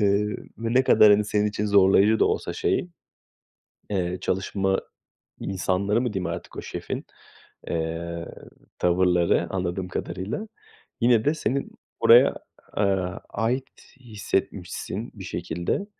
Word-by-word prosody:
Eee, 105 +1 +2 0.2
ne 120 +3 +2
kadar, 105 -4 +7
hani, 105 +1 +3
senin 105 0 +1
için 105 0 -2
zorlayıcı 100 +2 +5
da - - +6
olsa - - -1
şey, 180 - 0 1.0
eee, 90 -2 -1
çalışma 95 +1 0 0.6
insanları 95 +3 0
mı 120 -4 -1
diyeyim 95 -2 -2
artık, - - -6
o - - -4
şefin, - - -5 0.6
eee, 85 +1 -3 0.5
tavırları 90 -1 +2
anladığım 90 0 -2
kadarıyla 95 - -4 0.5
yine 120 -2 +4
de 150 - +2
senin 140 -3 -2 0.3
oraya, - - +7 0.4
aaa, 95 -2 0
ait 120 +5 -1 0.3
hissetmişsin 105 -2 -3
bir 95 -4 -9
şekilde. 85 - -3
100 Hz, 115 wpm, -25 LUFS, 90-110 Hz, 1.0 s, kadar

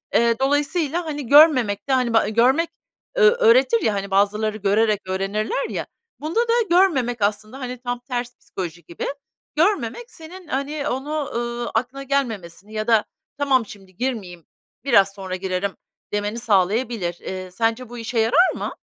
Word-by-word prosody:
Eee, 235 0 +3
dolayısıyla, 295 +4 0
hani, 295 -4 -5
görmemek 255 -9 +5
de - - +3
hani, 250 -3 +1
ba 225 - +4
görmek, 260 +9 +3 0.5
ö 445 -3 +7
öğretir 470 0 +4
ya, 215 - +1
hani, 200 0 -4
bazıları 210 +2 +1
görerek 210 +1 +2
öğrenirler 195 +7 -2
ya, - - -4 0.3
bunda 315 +9 -1
da 470 -1 +1 0.2
görmemek 275 - +3
aslında 215 +5 -1
hani, 250 -1 -5
tam 245 -1 -3
ters 245 -1 -5
psikoloji 170 -2 -7
gibi, 170 - -6 0.5
görmemek 360 - 0
senin, 360 0 -11
hani, 280 +2 -2
onu, 290 +3 -3
ııı, 240 0 -3
aklına 270 +2 -2
gelmemesini 215 -8 -3
ya 215 0 -3
da: 225 -2 +4 0.3
"Tamam, 270 -4 +2
şimdi 195 -3 -14
girmeyeyim, 200 -10 -4 0.4
biraz 200 -7 +4
sonra 190 -2 -5
girerim." 185 +1 -2 0.4
demeni 205 +2 -2
sağlayabilir. 205 -3 0
Eee, 185 -1 -6
sence 230 +4 -1
bu 245 - -8
işe 230 0 -2
yarar 295 +12 +4
mı? - - -4
240 Hz, 155 wpm, -22 LUFS, 205-285 Hz, 0.5 s, ö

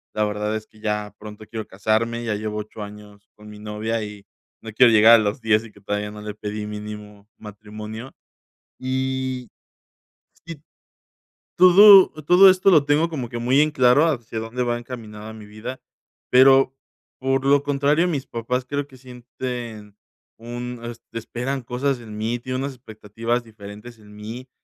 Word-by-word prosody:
La 105 - +1
verdad 105 +1 -2
es 110 0 -6
que 110 - -22
ya 105 -1 -3
pronto 105 0 -10
quiero 110 -2 -6
casarme, 110 +4 -1
ya 110 -3 -2
llevo 105 0 -4
8 105 0 -9
años 105 0 -13
con 105 0 -14
mi 105 0 -11
novia 110 +2 -3
y 105 -1 -9 0.4
no 110 - -9
quiero 120 +2 +5
llegar 110 +2 +8
a 110 - +3
los 105 +4 -2
10 110 0 +2
y 110 - -13
que 100 - -20
todavía 105 +1 -3
no 105 0 -10
le 105 0 -7
pedí, 105 0 -5
mínimo, 105 -1 -9
matrimonio. 105 +3 -9 0.7
Y 130 -1 -3 1.0
sí, 165 -4 -8 1.0
todo 190 +2 +8 0.2
todo 190 +2 +8
esto 185 +1 +3
lo 155 -5 +5
tengo 150 +3 +2
como 135 -8 -5
que 120 - -5
muy 130 +4 +2
en 155 0 +3
claro 125 0 +4
hacia 120 -7 -3
dónde 115 +3 -4
va 120 0 -1
encaminada 110 -3 -9
mi 110 -1 -12
vida, 110 +5 -8 0.5
pero, 135 +1 +6 0.5
por 135 0 0
lo 140 0 +4
contrario, 145 +4 +1
mis 145 -5 -3
papás 125 +2 -3
creo 145 0 -2
que 130 - -16
sienten 120 -4 -8 0.4
un 120 +1 -7
es 120 -1 -7
esperan 125 +4 -4
cosas 125 +2 -2
en 110 -2 -10
mí, 115 +3 -2
tienen 130 +2 -4
unas 140 -1 -4
expectativas 115 0 -4
diferentes 110 +2 -12
en 105 -1 -16
mí 115 +5 -8
115 Hz, 170 wpm, -22 LUFS, 105-130 Hz, 1.0 s, llegar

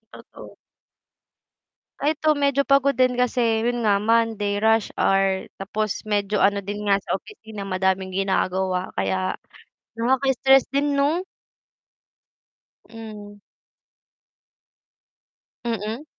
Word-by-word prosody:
Totoo. - - -13 1.4
Ay, 305 +2 +1
eto 310 +1 +1
medyo 280 -1 +2
pagod 275 0 +3
din, 255 -1 +2
kasi 250 0 +1 0.2
yun 240 0 -1
nga 205 -2 +3
Monday, 215 -2 +1
rush 220 -1 +3
hour 195 -1 +1
tapos 215 +2 -3
medyo 205 -1 0
ano 200 +1 +2
din 205 +2 -5
nga 200 - +4
sa - - -2
opisina, 220 - -10
madaming 190 0 -1
ginagawa 190 -1 -1
kaya 95 -1 -1 0.6
nakaka-stress 265 +2 +3
din 280 0 0
'no? 310 +6 +1 1.7
Hmm. 210 -2 -10 2.3
Mm. 225 +3 -3
215 Hz, 100 wpm, -23 LUFS, 195-255 Hz, 2.3 s, nga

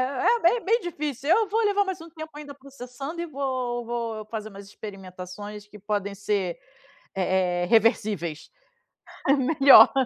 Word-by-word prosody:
é 260 - +2
é 470 - -6
b 340 - +6
é 480 - 0
bem 455 +4 +2
difícil, 300 - -4
eu 425 +3 +4
vou 445 +2 +1
levar 405 0 +3
mais 380 -3 -4
um 330 - -10
tempo 315 -1 -8
ainda 290 -1 -9
processando 275 +3 -8
e 345 - -3
vou 255 -4 -3
vou 230 -2 -4
fazer 215 -1 -5
umas 200 -1 -11
experimentações 195 0 -9
que 210 0 -14
podem 205 0 -2
ser, 200 -3 -2 0.6
eh 185 -1 +1
eh, - - +1
reversíveis. 210 -8 +1 0.8
É - - +7
melhor. 275 0 +7
240 Hz, 165 wpm, -25 LUFS, 205-300 Hz, 0.8 s, É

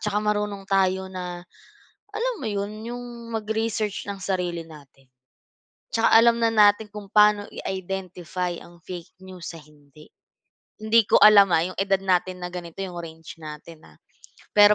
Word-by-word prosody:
tsaka 210 -1 -2
marunong 210 -1 -1
tayo 190 -1 +1
na 180 -1 -6 0.7
alam - - 0
mo - - -7
'yon? 210 +1 -4
Yung 240 -1 -8
mag-research 220 -1 -2
ng 195 - -10
sarili 180 -3 -2
natin. 135 -3 -16 0.8
Tsaka 225 - +2
alam 235 +1 +6
na 230 - +4
natin 210 0 +5
kung 210 -1 -9
paano 210 -1 +5
i-identify 180 -2 -4
ang 175 0 -16
fake 175 -1 -9
news 180 -2 -8
sa 165 - -10
hindi. 150 0 -19 0.7
Hindi 220 +1 +4
ko - - +6
alam, 205 -3 +8
ah, 160 - +4
yung - - -20
edad 195 -1 +2
natin 185 -1 0
na 180 - -3
ganito 170 -1 -8
yung 180 -2 -7
range 160 -1 -10
natin, 155 +1 -10
ah. - - -22 0.6
Pero 205 0 +8
195 Hz, 155 wpm, -24 LUFS, 175-210 Hz, 0.8 s, alam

